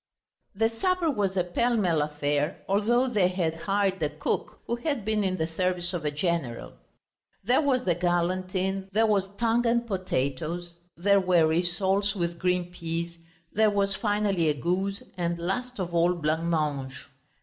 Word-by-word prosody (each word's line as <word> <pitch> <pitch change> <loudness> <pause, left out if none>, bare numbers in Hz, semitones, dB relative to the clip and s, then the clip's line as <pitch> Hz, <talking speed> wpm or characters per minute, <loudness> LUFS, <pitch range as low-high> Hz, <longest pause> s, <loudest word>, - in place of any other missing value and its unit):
The 225 +3 +3
supper 345 +7 +1
was 195 -6 -1
a 180 - +3
pell 235 +7 +1
mell 175 -7 +2
affair, 150 0 -1
although 230 +6 +2
they 210 -7 +3
had 180 -3 -1
hired 195 +2 0
a 150 - +1
cook 150 +1 -3
who 235 - -2
had 265 -4 -2
been 215 -1 +1
in 185 -1 0
the 160 - 0
service 180 +2 -1
of 175 -3 -3
a - - +2
general; 150 -5 -2 0.7
there 250 +5 +3
was 265 -4 +1
the 180 - +2
galantine, 185 +2 -1
there 220 +2 +4
was 200 -3 +1
tongue 235 +1 +2
and 235 0 +2
potatoes, 175 - -2 0.2
there 200 +3 +4
were 180 -3 +4
rissoles 190 +5 +1
with 170 -2 -2
green 180 -1 0
peas, 170 0 -4 0.4
there 215 0 +4
was, 200 -1 +1
finally, 205 -6 +1
a 150 - +1
goose, 190 +7 -1
and 170 -1 -1
last 245 +9 -3
of 175 -2 -3
all 170 +1 +3
blancmange. 155 -4 -1
185 Hz, 160 wpm, -27 LUFS, 170-205 Hz, 0.7 s, there